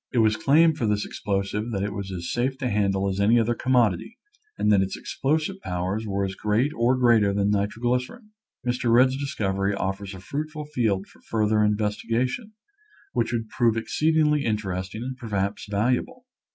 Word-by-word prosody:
It 130 - -2
was 110 -1 +4
claimed 155 +6 +4
for 115 - +1
this 105 0 0
explosive 100 +2 -2
that 100 -4 -2
it 100 0 -2
was 100 -1 -5
as 85 -2 -4
safe 130 +2 -1
to 130 -2 -2
handle 100 -1 +1
as 95 0 -2
any 110 +4 +4
other 115 +1 +1
commodity 125 - +1 0.4
and 105 - +2
that 100 -2 +5
its 95 0 -2
explosive 155 +7 -1
powers 95 +5 -3
were 100 -1 0
as 95 - -4
great 105 +8 +1
or 120 +2 +2
greater 115 -5 +4
than 100 0 +2
nitroglycerin. 125 - -1 0.3
Mr. 120 -1 0
Rudd's 130 +2 +5
discovery 100 -8 -1
offers 95 0 -3
a - - -9
fruitful 150 - -5
field 110 -10 0
for - - -22
further 110 -1 +1
in 105 0 +2
vestigation, 115 - -2 0.6
which 120 -2 0
would 115 -2 -2
prove 115 -2 +2
exceedingly 150 +4 +2
interesting 100 -1 -3
and 130 0 -5
perhaps 105 -4 -3
valuable. 125 - -1
110 Hz, 175 wpm, -25 LUFS, 100-130 Hz, 0.6 s, that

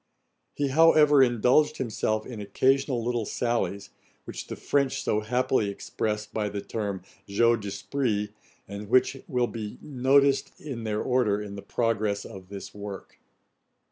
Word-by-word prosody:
He 145 -1 0
however 150 -1 +6
indulged 125 +4 +3
himself 110 -3 -1
in 115 -4 -7
occasional 130 +4 +1
little 120 -1 0
sallies, 115 -4 -2 0.3
which - - -7
the - - -5
French 140 -2 0
so 105 - +1
happily 115 -1 +1
express 105 +1 -3
by 105 -1 -3
the 100 0 -4
term 100 -3 -4 0.2
jeux 115 +4 +3
d'esprit, 105 +1 -2 0.4
and 100 +1 -7
which 130 +3 +3
will 125 -2 +1
be 110 -3 -6
noticed 135 0 +2
in 125 -7 -6
their 105 -1 -1
order, 125 -5 +2
in 105 -1 -6
the 100 - -7
progress 110 -3 -1
of 95 -1 -10
this 100 -1 -8
work. 100 -1 -8
115 Hz, 140 wpm, -27 LUFS, 105-130 Hz, 0.4 s, however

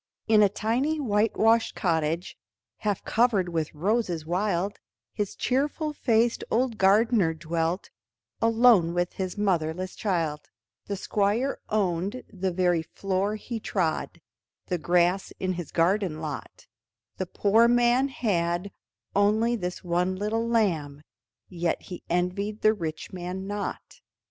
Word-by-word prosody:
In 215 -1 +5
a 205 - +6
tiny 250 +10 0
whitewashed 225 -1 +2
cottage, 160 +2 -1 0.4
Half 205 -3 -2
covered 220 -6 +2
with 160 -3 -2
roses 180 -2 0
wild, 190 +2 -1 0.3
His 205 -2 -3
cheerful 295 +4 -1
faced 235 -4 +1
old 240 -1 0
gardener 200 -3 +4
dwelt 165 +3 -2 0.5
Alone 225 -7 +5
with 175 0 0
his 190 +1 -4
motherless 185 -2 -1
child; 165 -7 -2 0.4
The 200 - -2
Squire 210 +7 0
owned 200 +3 -1
the 190 -1 -1
very 175 -2 +2
floor 195 +5 -2
he 225 +2 -5
trod, 175 -7 -2 0.5
The 180 - -2
grass 175 +3 +2
in 185 0 -1
his 175 -4 -6
garden 175 -1 +1
lot, 150 -4 -7 0.5
The 185 - -3
poor 220 +6 +4
man 245 +2 +3
had 180 -7 -1 0.4
only 215 +4 +3
this 180 -5 -4
one 180 +1 0
little 215 +4 -1
lamb 160 -11 0 0.4
Yet 175 -2 -1
he 180 -2 -9
envied 185 +5 -1
the 215 - +6
rich 165 -6 -5
man 185 +1 -5
not. 205 - -5
195 Hz, 125 wpm, -26 LUFS, 175-220 Hz, 0.5 s, a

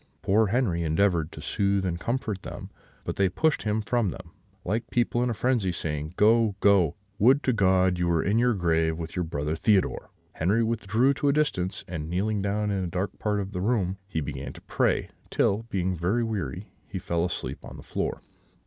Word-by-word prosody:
Poor 105 +2 +3
Henri 100 -6 +1
endeavoured 85 0 +1
to - - -9
soothe 100 -2 0
and 85 -2 -2
comfort 110 -3 -2
them; - - -8 0.3
but - - -4
they 100 -1 +3
pushed 155 - +1
him 110 0 -1
from 115 -2 +1
them, 85 - -9 0.3
like 115 +5 -2
people 120 0 +1
in 125 - +1
a - - 0
frenzy, 115 -4 +1
saying, 75 -1 -4
'Go, 110 -1 +4
go! 100 -7 +4 0.2
Would 130 +7 +5
to 130 - +2
God 95 -3 +3
you 90 - +1
were 85 -2 +2
in 105 +5 +2
your 120 -1 +3
grave 80 -3 +1
with 80 -1 -6
your 90 - 0
brother 75 -1 -2
Theodore!' 100 +3 +1 0.2
Henri 100 +8 +1
withdrew 115 +3 +2
to 145 - -1
a - - +3
distance, 100 -11 -1
and, 80 -3 -5
kneeling 100 +4 0
down 105 +1 0
in 95 -2 -1
a - - -2
dark 95 +3 -3
part 105 -1 0
of 100 0 -4
the 90 -3 -3
room, 100 -3 0
he 80 -5 -2
began 70 -2 -5
to - - -13
pray; - - 0 0.2
till, 110 +4 +1
being 95 -4 -1
quite 95 +9 +1
weary, 95 - -4 0.2
he 95 - -5
fell 85 -1 -1
fast - - -3
asleep - - -6
on - - -9
the - - -11
floor. - - -3
100 Hz, 205 wpm, -27 LUFS, 85-110 Hz, 0.3 s, Would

